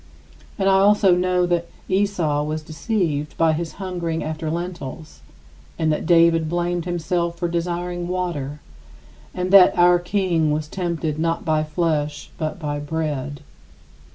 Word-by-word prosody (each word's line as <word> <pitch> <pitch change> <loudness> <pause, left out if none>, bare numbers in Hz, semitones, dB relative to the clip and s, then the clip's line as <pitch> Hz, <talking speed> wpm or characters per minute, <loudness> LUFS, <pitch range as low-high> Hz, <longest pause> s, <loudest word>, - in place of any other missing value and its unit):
And 195 - +1
I 190 0 +5
also 200 -1 +5
know 180 0 +2
that 175 -1 0 0.2
Esau 185 -7 +1
was 155 +1 -3
deceived 155 -3 -2
by 165 -1 +3
his 165 +1 -3
hungering 175 -4 -3
after 155 0 -4
lentils 170 -3 -6 0.6
and 160 -1 +1
that 155 - -2
David 165 -2 +4
blamed 175 0 -1
himself 170 0 -1
for 175 - -1
desiring 175 +1 -3
water, 160 -6 -3 0.7
and 180 0 -3
that 195 -2 +7
our 175 0 +6
King 175 -3 0
was 150 0 -1
tempted 165 -3 -3
not 165 +1 -1
by 155 -1 +2
flesh 155 -2 -2
but 155 -1 -2
by 145 -3 -3
bread. 145 -2 -3
170 Hz, 140 wpm, -22 LUFS, 155-180 Hz, 0.7 s, that